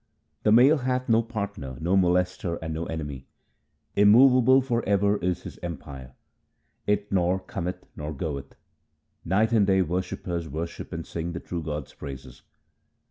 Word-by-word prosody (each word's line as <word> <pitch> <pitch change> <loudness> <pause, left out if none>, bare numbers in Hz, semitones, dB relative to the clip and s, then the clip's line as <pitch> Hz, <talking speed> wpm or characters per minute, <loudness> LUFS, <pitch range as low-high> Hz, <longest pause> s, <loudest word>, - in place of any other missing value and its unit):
The 105 - +3
Male 130 +7 +6
hath 130 0 -1
no 115 0 +5
partner, 100 - -5
no 85 +4 +1
molester, 90 -1 +1
and 80 0 -4
no 80 +1 -3
enemy. 75 -5 -5 0.7
Immovable 125 +5 +6
for 120 -3 -1
ever 100 +1 +3
is 90 -1 -2
His - - -9
empire; 70 -6 -7 0.7
it 105 0 0
nor 90 -1 +2
cometh 90 -1 -5
nor 75 +1 -5
goeth. 70 -2 -5 0.7
Night 105 +6 +2
and 105 -4 +4
day 95 -1 +4
worshippers 85 -1 -3
worship 80 +4 -5
and - - -5
sing 85 +1 -4
the 85 - -4
true 85 -1 -5
God's 75 -3 -5
praises. 65 -3 -9
90 Hz, 145 wpm, -26 LUFS, 80-105 Hz, 0.7 s, Male